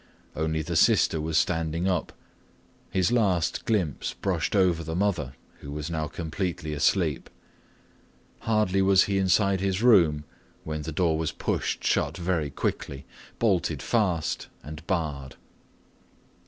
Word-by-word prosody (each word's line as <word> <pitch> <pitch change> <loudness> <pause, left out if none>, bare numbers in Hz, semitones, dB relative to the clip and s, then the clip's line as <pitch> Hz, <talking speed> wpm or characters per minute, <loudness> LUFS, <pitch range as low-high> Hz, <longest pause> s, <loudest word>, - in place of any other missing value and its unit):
Only 80 0 -1
the - - -4
sister 80 - +4
was 80 0 -1
standing 80 +1 0
up. 90 -4 -1 0.8
His 95 0 +1
last 100 -9 +1
glimpse 90 -11 -1
brushed - - -1
over 90 -4 +3
the 80 +1 -4
mother 85 -9 -1 0.2
who 70 - -9
was 75 +2 -5
now 80 -2 -2
completely 80 0 -4
asleep. 75 +1 +1 1.1
Hardly 105 -4 +1
was 95 -1 +5
he 100 -1 0
inside 95 +1 +2
his 95 +2 -1
room 85 -11 +5 0.4
when 75 -1 -4
the 80 +2 -5
door 80 0 +1
was 80 - -1
pushed - - -2
shut - - +1
very 85 -4 -1
quickly, 70 0 -4 0.3
bolted - - 0
fast, 95 -9 0 0.2
and 75 +1 -9
barred. 75 -7 -2
85 Hz, 130 wpm, -26 LUFS, 75-95 Hz, 1.1 s, was